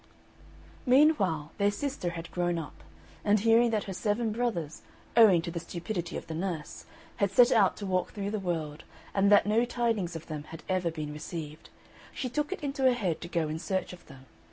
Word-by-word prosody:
Meanwhile 210 - +3
their 200 0 +4
sister 235 -3 -3
had 170 -1 -7
grown 175 -1 0
up; 160 -3 -6 0.5
and 210 +1 +3
hearing 230 +2 +5
that 215 -2 0
her 195 - -6
seven 215 +4 0
brothers, 210 -10 -2 0.3
owing 205 -8 +7
to 170 - -4
the 170 - -3
stupidity 175 +1 -4
of - - -7
the 160 - -6
nurse, 165 -2 -4 0.3
had 200 - +2
set 240 +6 +5
out 200 -5 +4
to 205 - -5
walk 185 -1 0
through 200 -1 -4
the 215 - -2
world, 160 -5 -3 0.3
and 200 +1 +3
that 205 - +6
no 215 +3 +3
tidings 230 -8 -1
of 165 - -7
them 150 -2 -6
had 160 - -10
ever 185 -2 0
been 155 -2 -5
received, 155 0 -7 0.5
she 255 - -3
took 295 +6 -2
it 390 -4 -5
into 275 -1 -3
her 255 - +6
head 185 -9 -2
to 170 - -6
go 170 -3 -1
in 155 +1 -4
search 185 +2 -2
of 180 - -13
them. 135 -3 -14
190 Hz, 200 wpm, -29 LUFS, 165-225 Hz, 0.5 s, owing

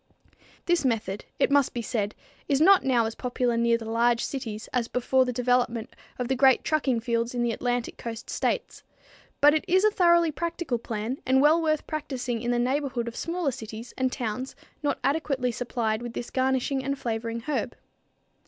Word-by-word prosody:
This 350 -2 +2
method, 220 -6 -1
it - - +2
must 280 -3 +3
be 235 - -2
said, 210 -2 -2 0.3
is 275 -1 +3
not 380 +4 +6
now 245 -4 +3
as 225 - -3
popular 245 -1 -1
near 235 0 +3
the 225 - -8
large 230 +1 +2
cities 225 -5 -5
as 245 -3 0
before 255 +2 +2
the 250 - -1
development 245 -2 0 0.2
of 250 - -2
the 265 - +1
great 265 0 +5
trucking 270 -6 +1
fields 235 +1 -1
in 240 - 0
the 240 - +1
Atlantic 245 +1 -2
coast 225 -1 -6
states; - - -2 0.6
but 295 +1 +7
it 310 - +1
is 375 +2 +3
a 430 - +5
thoroughly 345 -4 +4
practical 335 -5 -3
plan 225 +3 -4
and 260 +1 +3
well 305 +4 +5
worth 310 -2 0
practicing 260 -6 -3
in 240 - -2
the 245 - +2
neighborhood 255 -1 -1
of 235 - -5
smaller 335 -3 -1
cities 225 -1 -8
and 260 -1 0
towns 250 +1 -4 0.3
not 290 - 0
adequately 275 -3 0
supplied 230 -2 -2
with 240 -1 -6
this 240 - -6
garnishing 265 +1 0
and 275 +1 -2
flavoring 230 -1 -3
herb. 300 +5 -3
250 Hz, 185 wpm, -26 LUFS, 235-280 Hz, 0.6 s, but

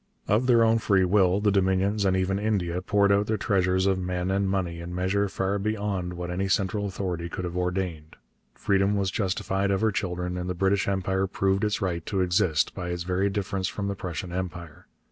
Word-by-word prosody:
Of 110 +5 +2
their 120 -2 +5
own 115 0 +3
free 100 -4 +3
will 95 0 +3
the 105 0 +3
Dominions 100 +1 +1
and 95 -1 +2
even 95 +1 0
India 95 -5 -1
poured 100 +1 +2
out 100 +1 +2
their 110 - 0
treasures 95 -3 +1
of 95 -1 +2
men 90 0 -2
and 100 0 +1
money 90 -3 -2
in 85 +1 -6
measure 95 +2 0
far 95 +1 -1
beyond 100 -4 -2
what 90 0 -5
any 95 +2 -1
central 100 +2 0
authority 90 -3 -4
could 90 - -4
have 85 0 -5
ordained. 90 -4 -3 0.4
Freedom 100 +1 +1
was 100 -2 0
justified 95 0 -1
of 95 -1 +1
her 110 -1 +3
children, 90 -2 -3
and 90 +1 -4
the 90 - -2
British 95 +2 +1
Empire 95 0 0
proved 95 0 0
its 105 -1 0
right 85 -3 -2
to 95 -2 0
exist 90 -4 +2
by 90 -2 -5
its 90 0 -3
very 90 +2 0
difference 95 -1 -2
from 100 +2 -3
the 100 - -2
Prussian 90 -1 -5
Empire. 85 -3 -6
95 Hz, 205 wpm, -26 LUFS, 90-100 Hz, 0.4 s, their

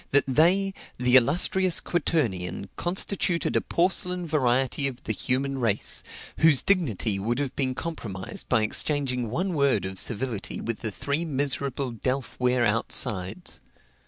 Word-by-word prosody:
that 140 - +3
they, 180 +8 +2 0.2
the 125 0 +2
illustrious 170 +7 +3
quaternion, 100 - -2
constituted 175 -1 0
a - - +3
porcelain 180 0 0
variety 135 -2 +1
of 130 -2 -7
the - - -2
human 135 +1 -1
race, 110 -5 +2 0.4
whose 160 -4 +5
dignity 115 - +1
would 115 +5 -1
have 140 -2 -3
been 130 -2 -1
compromised 110 - -5
by 115 -4 +3
exchanging 125 0 0
one 180 - -2
word 140 - +1
of 95 -1 -1
civility 115 -2 -3
with 115 -1 -3
the 110 - -3
three 140 +9 -3
miserable 140 -3 -1
delf 130 +4 -3
ware 125 -1 +2
outsides. 105 -3 0
130 Hz, 135 wpm, -26 LUFS, 115-160 Hz, 0.4 s, whose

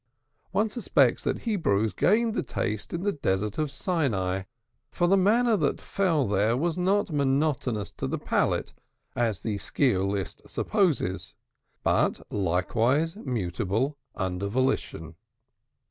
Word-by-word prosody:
One 210 +3 +1
suspects 240 - +2
that - - -1
Hebrews 110 - +1
gained 220 - +2
the - - 0
taste 110 -4 -3
in 170 +1 -3
the 205 - +2
Desert 105 - -1
of 155 -1 0
Sinai, 115 - 0 0.4
for 175 - 0
the 185 +3 +4
manna 220 +4 +3
that 150 -6 0
fell 165 -9 0
there 105 +4 +2
was 165 +3 0
not 190 +1 +1
monotonous 135 -6 0
to 65 - -2
the - - -2
palate - - 0 0.4
as 115 -5 0
the 105 -3 -2
sciolist 100 - -1
supposes, 170 - 0 0.5
but - - +2
likewise 115 - +1
mutable 115 - -2 0.2
under 95 0 -2
volition. 100 -9 -1
130 Hz, 125 wpm, -27 LUFS, -, 0.5 s, the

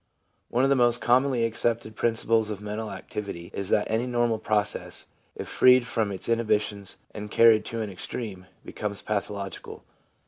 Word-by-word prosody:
One 125 +2 +1
of 135 - +3
the - - +5
most 120 -2 +4
commonly 125 0 +2
accepted 115 -1 -1
principles 115 -1 +2
of 105 -2 -4
mental 105 +1 -5
activity 100 -7 -7
is 100 0 -2
that 105 - +2
any 115 +3 -1
normal 120 -2 +1
process, 105 -2 0 0.3
if - - -6
freed 125 -1 +5
from 110 -4 -1
its 95 - -1
inhibitions 105 -3 0 0.2
and 105 0 -7
carried 110 -1 +5
to 115 0 -4
an 105 -2 -4
extreme, 95 0 -6 0.2
becomes 100 -1 -4
pathological. 100 -2 -4
110 Hz, 160 wpm, -26 LUFS, 105-120 Hz, 0.3 s, the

